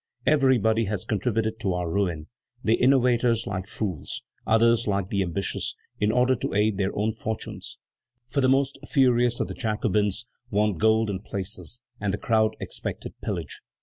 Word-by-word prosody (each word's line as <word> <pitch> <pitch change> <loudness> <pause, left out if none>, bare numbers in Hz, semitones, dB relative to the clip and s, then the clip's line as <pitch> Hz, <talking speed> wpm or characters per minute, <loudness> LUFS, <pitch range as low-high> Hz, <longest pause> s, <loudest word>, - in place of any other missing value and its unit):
Everybody 125 -6 +3
has 100 -2 -3
contributed 110 +1 -1
to 95 -5 0
our 90 -1 -2
ruin: 85 -3 -1 0.4
the 110 - +3
innovators 125 -2 +3
like 95 -1 -4
fools, 95 -8 -4 0.2
others 115 +1 +4
like 100 -2 0
the 100 - 0
ambitious, 95 +1 -2 0.2
in 105 +1 +2
order 125 +2 +3
to - - -3
aid 105 -1 +2
their 95 -1 +2
own 110 +2 +1
fortunes; 110 +1 -5 0.5
for 140 +3 -1
the 130 - +4
most 135 +1 +2
furious 125 -3 +3
of - - 0
the - - -5
Jacobins 105 -2 0 0.2
wanted 105 -4 +1
gold 110 -1 +3
and 95 0 -5
places, 100 +3 -5 0.2
and 100 -2 0
the 100 - -2
crowd 110 0 +2
expected - - -5
pillage. - - -4
110 Hz, 160 wpm, -26 LUFS, 100-120 Hz, 0.5 s, others